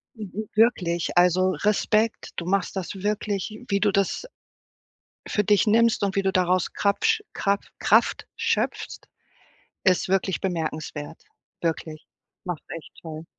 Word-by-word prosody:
W 215 -2 -6
w 205 +2 -6
wirklich, 180 -7 +3
also 180 +1 +4
Respekt, 215 +1 +1
du 170 - -4
machst 195 +1 0
das 190 +1 -4
wirklich 210 +1 -2
wie 200 - +2
du 205 0 +3
das 200 - 0 1.0
für 210 - +1
dich 205 +2 +3
nimmst 230 +2 +4
und 195 -2 0
wie 195 - +3
du 195 - +1
daraus 185 -1 +2
Krapsch 445 - +2
Kra 200 0 +1 0.2
Kraft - - +3
schöpfst, - - -1 0.9
ist 185 -1 +3
wirklich 190 0 +1
bemerkenswert. 160 -4 -4 0.4
Wirklich, 160 -1 -3 0.4
machst 175 -4 -4
du - - -6
echt 165 - -9
toll. 160 -1 -7
195 Hz, 140 wpm, -25 LUFS, 175-210 Hz, 1.0 s, also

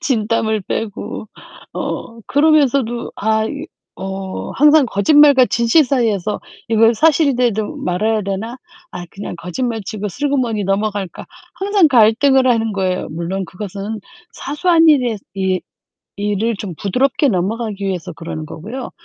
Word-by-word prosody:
진땀을 220 -5 0
빼고 215 +1 -5 0.4
어 230 0 -5
그러면서도 280 -5 +2
아 220 +1 +1
이 - - -6 0.3
어 190 0 -5
항상 300 0 +5
거짓말과 270 +6 +5
진실 235 +6 +3
사이에서 220 -7 0 0.3
'이거 225 +1 +4
사실이라도 250 -7 +2
말해야 215 +5 0
되나? 200 +5 -4 0.3
아 175 - -7
그냥 195 -2 -7
거짓말치고 210 +3 -4
슬그머니 250 -4 -1
넘어갈까?' 200 -1 -2 0.3
항상 390 -3 +2
갈등을 260 +2 +4
하는 225 -3 +2
거예요. 185 -2 -1
물론 170 +4 -3
그것은 200 +3 -6 0.3
사소한 325 +3 +2
일에 250 -8 +3 0.2
이 190 -1 0 0.6
일을 210 +3 -1
좀 195 -4 -6
부드럽게 260 +7 +1
넘어가기 205 +1 -2
위해서 185 -5 -3
그러는 155 -1 -6
거고요. 220 - -7
220 Hz, 300 characters per minute, -18 LUFS, 195-260 Hz, 0.6 s, 항상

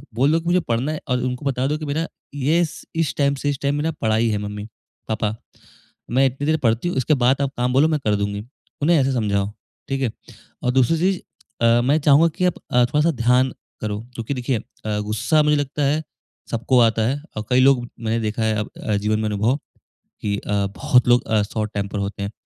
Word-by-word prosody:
बोल 135 +6 +3
दो 165 - +3
की - - -16
मुझे 180 +1 +4
पढ़ना 125 +6 0
है 155 - -4
और 125 0 +2
उनको 125 +2 -3
बता 130 -1 0
दो 150 - 0
की 155 - -6
मेरा 155 +3 -1 0.3
ये 155 +5 +2
स 155 - -10
इस 165 -3 0
टाइम 140 -1 +2
से 145 - +1
इस 140 - -2
टाइम 140 0 +1
मेरा 155 +2 0
पढ़ाई 110 +1 +2
है 105 - 0
मम्मी-पापा। 105 +1 -5 0.8
मैं 130 +2 +4
इतनी 135 +2 -4
देर 160 0 +3
पढ़ती 115 +8 +2
हूँ 175 - -3
उसके 130 +4 +2
बाद 135 +3 +3
आप 140 - 0
काम 125 +1 0
बोलो 145 +4 +5
मैं 155 -2 +1
कर 105 - +3
दूँगी। 100 +1 -2 0.4
उन्हें 165 +2 +4
ऐसे 135 0 +2
समझाओ, 100 -4 0 0.4
ठीक 135 0 -1
है? 120 -5 0 0.5
और 125 - +2
दूसरी 130 +5 +3
चीज़ 185 +2 +1 0.5
अ, 115 +1 +5
मैं 140 +5 +2
चाहूँगा 150 +2 +5
कि 180 - +1
अ, 180 - +4 0.2
आप 125 0 +5
थोड़ा-सा 150 +3 +3
ध्यान 125 +1 +2 0.3
करो 105 -1 -2 0.2
क्योंकि 115 +4 -3
देखिए 125 -1 -1
अ, 105 0 -5
गुस्सा 110 +9 +1
मुझे 150 0 +3
लगता 145 +1 -2
है 150 +3 +1 0.5
सबको 120 +2 +2
आता 115 -1 +3
है 140 +3 -1 0.2
और 105 - -3
कई 125 0 +4
लोग 130 -2 +5 0.2
मैंने 115 0 -1
देखा 110 +1 -2
है 110 -1 +1
अब 105 - -3
अ, 105 - 0
जीवन 105 +1 0
में 110 - -1
अनुभव 110 +6 +1 0.6
की 100 -1 -1
अ, 100 -1 -1
बहुत 125 -1 +3
लोग 120 +1 +4
अ, 110 -1 +2
शॉर्ट 105 +1 -3
टेंपर 100 0 -3
होते 100 0 -3
हैं। 100 - -3
125 Hz, 220 wpm, -22 LUFS, 110-145 Hz, 0.8 s, बोलो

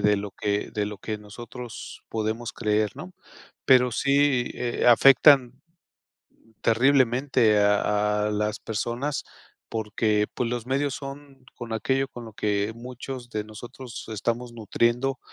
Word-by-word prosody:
de 105 0 +3
lo 100 0 -4
que 105 +1 -2
de 105 -1 -2
lo 105 -1 -6
que 105 +1 -4
nosotros 120 +3 -9
podemos 110 +1 -3
creer, 105 -2 0
¿no? 185 +1 -9 0.5
Pero 125 -2 +6
sí, 140 -1 +2
eh, 120 -1 -2
afectan, 130 +1 +7 0.9
mm, 115 - -27
terriblemente 125 -2 +3
a 105 +1 +2
a - - 0
las 105 +1 -1
personas 120 +6 -3 0.5
porque, 105 -1 0
pues, 120 -2 -1
los 120 -1 -3
medios 140 +1 0
son 135 -1 -9
con 120 -2 -7
aquello 135 +4 0
con 120 -4 -9
lo 110 - -10
que 105 0 0
muchos 125 0 -8
de 105 -1 -3
nosotros 120 +3 -9
estamos 120 +3 -3
nutriendo 120 +4 0
120 Hz, 135 wpm, -25 LUFS, 105-130 Hz, 0.9 s, afectan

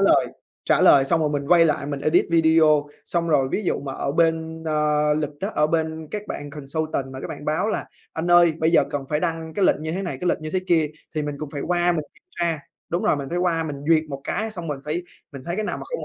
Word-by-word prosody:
lời, - - +4 0.4
trả - - +3
lời 135 -1 +7
xong 165 +4 +2
rồi 150 - +2
mình 145 -1 -3
quay 170 -1 +6
lại 150 -3 0
mình 140 -1 -4
edit 155 - +3
video. 160 -3 +4 0.2
Xong 170 -1 -1
rồi 135 -4 +3
ví 215 - 0
dụ - - 0
mà 135 -1 -5
ở 140 +1 -2
bên, 160 0 0
ờ, 150 -1 +2
lịch 150 -1 -3
á, 195 - -1
ở 150 - +3
bên 160 0 -2
các 210 0 -5
bạn 145 0 -6
consultant 150 0 -3
mà 130 - -7
các - - -6
bạn - - -7
báo 155 +8 0
là - - -2 0.3
"Anh 165 +2 -2
ơi, 175 -1 +6
bây 160 +1 +2
giờ - - +6 0.3
phải 150 0 0
đăng 165 -2 -3
cái 200 - +1
lệnh 155 - +3
như 160 +1 -3
thế 190 - -2
này, 180 - -4
cái 180 - 0
lịch - - +1
như 155 - -5
thế 185 - +1
kia", 165 -4 +3 0.3
thì 155 - -1
mình 145 -1 -3
cũng 150 -1 -6
phải 140 -1 -5
qua 175 0 +2
mình 155 -3 -2
kiểm - - -27 0.2
tra 165 -2 +1 0.3
đúng 175 - -1
rồi, - - +2
mình 140 -1 -5
phải 175 - -2
qua 170 -2 +1
mình 150 -3 -4
duyệt 160 -1 +4
một 140 -1 -6
cái, 220 +1 -2
xong 175 -6 -7
mình 145 - -3
phải 155 +4 -2 0.3
mình 140 -2 -8
thấy 175 +4 -3
cái 215 - -1
nào - - -2
mà - - -8
không 485 - -5
160 Hz, 275 wpm, -23 LUFS, 150-170 Hz, 0.4 s, lời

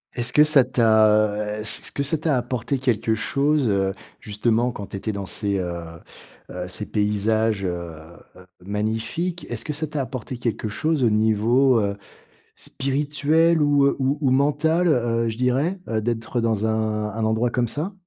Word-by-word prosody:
Est-ce 120 0 -2
que 150 - +7
ça 150 -3 +5
t'a, 110 -3 +2
heu, - - -4
s 110 +1 +1
est-ce - - -3
que - - -3
ça 150 +3 0
t'a 150 -3 0
apporté 125 +2 -2
quelque 120 -3 0
chose, 140 +5 +1
heu, 95 -1 +1 0.3
justement 115 +3 0
quand 100 -3 -8
tu 100 - -6
étais 110 +2 -3
dans 100 -1 -5
ces, 100 0 -2
heu, 85 -1 -4 0.7
heu, 90 0 -5
ces 105 +3 -5
paysages, 105 0 0
heu, - - 0 0.7
heu, 90 0 -15 0.2
magnifiques? 110 - -2
Est-ce 120 -2 -5
que 150 - -3
ça 155 +2 -2
t'a 150 -1 -3
apporté 130 -1 -6
quelque 115 -2 -3
chose 155 +6 0
au 115 - +4
niveau, 110 +4 +3
heu, 100 0 -2 0.6
spirituel 150 +4 +1
ou 145 -1 +4
ou 135 +2 +1
ou 135 - +2
mental, 150 +6 +2
heu, 115 -5 +1
je 110 - -4
dirais, 135 +9 0
heu, 110 -1 0
d'être 115 +2 -2
dans 110 -2 0
un 110 -1 -1
un 110 +1 -3
endroit 110 +2 +1
comme 120 0 0
ça? 155 - -4
115 Hz, 175 wpm, -23 LUFS, 105-140 Hz, 0.7 s, que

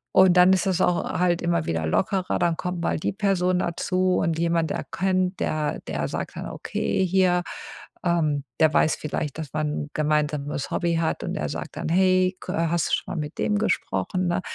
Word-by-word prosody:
Und 185 -1 +6
dann 180 +1 +7
ist 190 +1 +1
das 185 -2 +1
auch 180 -1 +2 0.2
halt 175 -1 +2
immer 170 0 0
wieder 80 -1 -1
lockerer, 190 - 0
dann 170 -1 +2
kommt 180 +1 -4
mal - - 0
die - - -1
Person 185 -3 +1
dazu 185 +1 0
und 165 -1 0
jemand 170 -1 +1
erkennt 185 0 -1
der 150 -1 -1
der - - -2
sagt - - -5
dann, - - -5
okay, 190 - -1
hier, 180 -1 +3 0.6
ähm 155 -5 +1 0.2
der 155 -1 +5
weiß 155 - +3
vielleicht, 150 -1 -4
dass 155 -4 -6
man 155 0 0 0.2
'n - - -15
gemeinsames 150 -2 -1
Hobby 170 -1 0
hat 165 -1 -1
und - - -3
er 75 - -2
sagt 75 +1 -6
dann: - - -3
„Hey, 185 +1 +3
kö - - -5
hast 165 0 0
du - - -2
schon - - -1
mal - - -2
mit 150 +1 -7
dem 210 - +1
gesprochen“, 185 - -1
ne? 175 +1 0
170 Hz, 200 wpm, -24 LUFS, 155-185 Hz, 0.6 s, dann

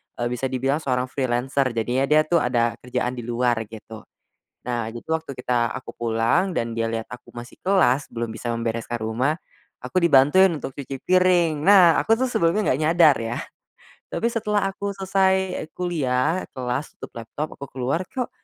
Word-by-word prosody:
eee, 120 - -2
bisa 125 +2 -1
dibilang 135 +3 0
seorang 130 -5 0
freelancer 130 0 0
jadinya 125 +4 0
dia 155 +1 +5
tuh 170 +2 +2
ada 120 -3 0
kerjaan 125 0 -2
di 120 - -7
luar 120 -1 +1
gitu. 110 0 -11 0.6
Nah 120 -2 -2
itu 120 +1 -10
waktu 160 -5 -5
kita 120 -2 0
aku - - -7
pulang 115 +11 +1
dan 115 -9 -2
dia 115 0 -1
liat 115 0 -3
aku 125 - -11
masih 120 +1 -11
kelas 165 -8 +2
belum 120 0 -3
bisa 120 - -4
membereskan 115 0 -3
rumah, 120 +8 -1 0.4
aku 170 +9 -2
dibantuin 170 +5 +6
untuk 135 - -7
cuci 135 -1 -6
piring. 180 -4 +3
Nah 185 -2 +7
aku 225 0 +2
tuh 260 - +1
sebelumnya 185 - +1
gak 135 - -3
nyadar 160 -1 +5
yah. 115 +1 -3 0.7
Tapi 230 - 0
setelah 210 -4 0
aku 200 +1 -4
selesai 190 -1 +1
kuliah, 160 -2 0
kelas, 130 +2 -3
tutup - - -10
laptop 135 +7 -6
aku 140 - -7
keluar, 135 +8 -1
kok, 250 +5 -4
135 Hz, 170 wpm, -23 LUFS, 120-175 Hz, 0.7 s, Nah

